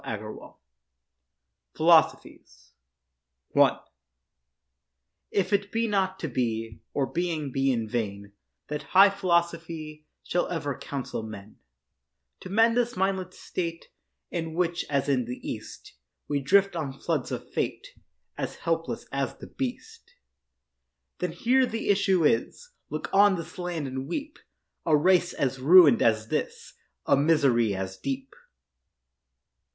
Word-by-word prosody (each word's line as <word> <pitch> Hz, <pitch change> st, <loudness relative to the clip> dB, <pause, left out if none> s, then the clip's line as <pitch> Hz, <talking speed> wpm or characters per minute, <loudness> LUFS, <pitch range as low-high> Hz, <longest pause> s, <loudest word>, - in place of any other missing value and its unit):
PHILOSOPHIES 60 Hz, 0 st, +2 dB, 0.8 s
I -, -, +4 dB, 1.5 s
If 195 Hz, 0 st, 0 dB
it 200 Hz, 0 st, +1 dB
be 230 Hz, 0 st, 0 dB
not 190 Hz, -2 st, 0 dB
to 165 Hz, -, -4 dB
be, 115 Hz, -4 st, -2 dB
Or 140 Hz, -, 0 dB
being 165 Hz, -3 st, -2 dB
be 135 Hz, +1 st, +1 dB
in 115 Hz, -3 st, -1 dB
vain, 100 Hz, -3 st, -4 dB, 0.4 s
That 150 Hz, 0 st, -4 dB, 0.2 s
high 195 Hz, +1 st, +9 dB
philosophy 170 Hz, -4 st, -2 dB, 0.2 s
Shall 175 Hz, -, 0 dB
ever 145 Hz, -6 st, -3 dB
counsel 135 Hz, -4 st, -5 dB
men 110 Hz, -1 st, -10 dB, 0.8 s
To -, -, -9 dB
mend 225 Hz, +4 st, +4 dB
this 245 Hz, 0 st, 0 dB
mindless 190 Hz, -1 st, -1 dB
state 165 Hz, -2 st, -5 dB, 0.4 s
In 165 Hz, -2 st, -4 dB
which, 175 Hz, -1 st, 0 dB
as 140 Hz, -1 st, 0 dB
in 130 Hz, -4 st, +1 dB
the 125 Hz, +2 st, -6 dB
East, -, -, -8 dB, 0.3 s
We 145 Hz, -1 st, 0 dB
drift 195 Hz, +7 st, +3 dB
on 150 Hz, -5 st, -3 dB
floods 155 Hz, -7 st, -2 dB
of -, -, -5 dB
fate, -, -, -3 dB, 0.5 s
As -, -, -3 dB
helpless 165 Hz, 0 st, -2 dB
as 135 Hz, -2 st, -2 dB
the -, -, -11 dB
beast, 125 Hz, -2 st, -6 dB, 1.0 s
Then 180 Hz, -2 st, -1 dB
here 250 Hz, +9 st, +2 dB
the 225 Hz, -2 st, -4 dB
issue 190 Hz, -4 st, +3 dB
is— 485 Hz, -, 0 dB, 0.2 s
Look -, -, -4 dB
on 200 Hz, 0 st, +6 dB
this 170 Hz, 0 st, -7 dB
land 175 Hz, -4 st, -3 dB
and 130 Hz, 0 st, -5 dB
weep— 290 Hz, -, -5 dB, 0.4 s
A 155 Hz, -2 st, +4 dB
race 180 Hz, +3 st, +3 dB
as 135 Hz, -1 st, -1 dB
ruin'd 150 Hz, -3 st, +7 dB
as 110 Hz, 0 st, +2 dB
this, -, -, -3 dB, 0.3 s
A -, -, +4 dB
misery 135 Hz, -8 st, +3 dB
as 95 Hz, 0 st, -5 dB
deep. 135 Hz, +6 st, -4 dB
160 Hz, 125 wpm, -27 LUFS, 130-185 Hz, 1.5 s, high